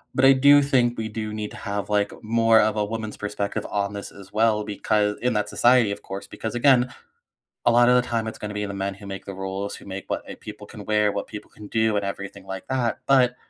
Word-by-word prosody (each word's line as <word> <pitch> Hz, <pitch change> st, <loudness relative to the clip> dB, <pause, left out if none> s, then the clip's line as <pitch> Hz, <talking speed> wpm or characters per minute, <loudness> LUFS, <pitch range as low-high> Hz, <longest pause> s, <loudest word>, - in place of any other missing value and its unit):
But 130 Hz, -, +4 dB
I 135 Hz, -, +9 dB
do 140 Hz, +2 st, +6 dB
think 125 Hz, -4 st, +2 dB
we 110 Hz, -1 st, -2 dB
do 110 Hz, 0 st, -5 dB
need 105 Hz, -1 st, -4 dB
to -, -, -10 dB
have, 100 Hz, 0 st, -4 dB
like, 105 Hz, -1 st, +2 dB
more 115 Hz, 0 st, +4 dB
of 110 Hz, +1 st, +2 dB
a 105 Hz, -, +1 dB
woman's 110 Hz, 0 st, -4 dB
perspective 105 Hz, -1 st, -3 dB
on 100 Hz, 0 st, -1 dB
this 100 Hz, -, -6 dB
as 95 Hz, -1 st, -14 dB
well 110 Hz, -1 st, +2 dB
becau 105 Hz, 0 st, 0 dB
In 125 Hz, -1 st, +1 dB
that 105 Hz, -1 st, -1 dB
society 120 Hz, -3 st, +4 dB
of 100 Hz, -, -5 dB
course, 100 Hz, +1 st, -7 dB
because 110 Hz, +3 st, -6 dB
again, 125 Hz, 0 st, +4 dB, 0.7 s
a 120 Hz, -, +6 dB
lot 120 Hz, +1 st, +5 dB
of 125 Hz, -, +6 dB
the 125 Hz, 0 st, +2 dB
time 115 Hz, -2 st, -1 dB
it's 110 Hz, -, -6 dB
gonna 105 Hz, 0 st, -6 dB
be 105 Hz, 0 st, -2 dB
the 100 Hz, -, -5 dB
men 95 Hz, 0 st, -2 dB
who 100 Hz, 0 st, -12 dB
make 95 Hz, 0 st, -7 dB
the 100 Hz, -, -6 dB
rules, 95 Hz, +1 st, -4 dB
who -, -, -13 dB
make 95 Hz, 0 st, -7 dB
what, -, -, -4 dB
uh, -, -, -6 dB
people -, -, -10 dB
can -, -, -10 dB
wear, 105 Hz, -1 st, +2 dB
what 100 Hz, -, -3 dB
people 105 Hz, 0 st, -9 dB
can 105 Hz, -, -13 dB
do, 110 Hz, 0 st, +1 dB
and 100 Hz, -, 0 dB
everything 100 Hz, 0 st, -6 dB
like 95 Hz, -1 st, -7 dB
that. 130 Hz, -3 st, -1 dB
But 125 Hz, -2 st, +4 dB
105 Hz, 255 wpm, -24 LUFS, 100-120 Hz, 0.7 s, I